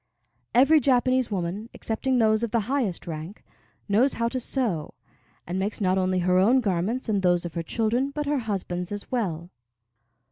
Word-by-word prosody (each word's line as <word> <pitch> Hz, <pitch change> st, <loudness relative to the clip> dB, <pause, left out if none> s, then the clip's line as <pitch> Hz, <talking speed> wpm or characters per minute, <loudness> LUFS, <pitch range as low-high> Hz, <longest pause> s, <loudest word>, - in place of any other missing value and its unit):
Every 275 Hz, +6 st, +6 dB
Japanese 255 Hz, -1 st, +2 dB
woman 195 Hz, +3 st, -3 dB
(excepting 255 Hz, +3 st, -1 dB
those 220 Hz, -2 st, +3 dB
of 235 Hz, -, -1 dB
the 230 Hz, +1 st, +1 dB
highest 230 Hz, -5 st, -2 dB
rank) 165 Hz, +4 st, -7 dB, 0.4 s
knows 225 Hz, +7 st, +3 dB
how 230 Hz, 0 st, 0 dB
to 255 Hz, -, -3 dB
sew, 225 Hz, -, -2 dB, 0.5 s
and 180 Hz, +2 st, -3 dB
makes 200 Hz, +2 st, -2 dB
not 190 Hz, -2 st, +2 dB
only 185 Hz, 0 st, +1 dB
her 180 Hz, 0 st, +4 dB
own 235 Hz, +8 st, +5 dB
garments 210 Hz, +3 st, -1 dB
and 205 Hz, -3 st, +1 dB
those 175 Hz, -1 st, +2 dB
of 170 Hz, -, -6 dB
her 170 Hz, -, -2 dB
children, 230 Hz, -, 0 dB
but 295 Hz, +1 st, -4 dB
her 290 Hz, -1 st, 0 dB
husband's 185 Hz, -5 st, -3 dB
as 205 Hz, 0 st, -6 dB
well. 180 Hz, -8 st, -2 dB
215 Hz, 175 wpm, -25 LUFS, 185-250 Hz, 0.5 s, Every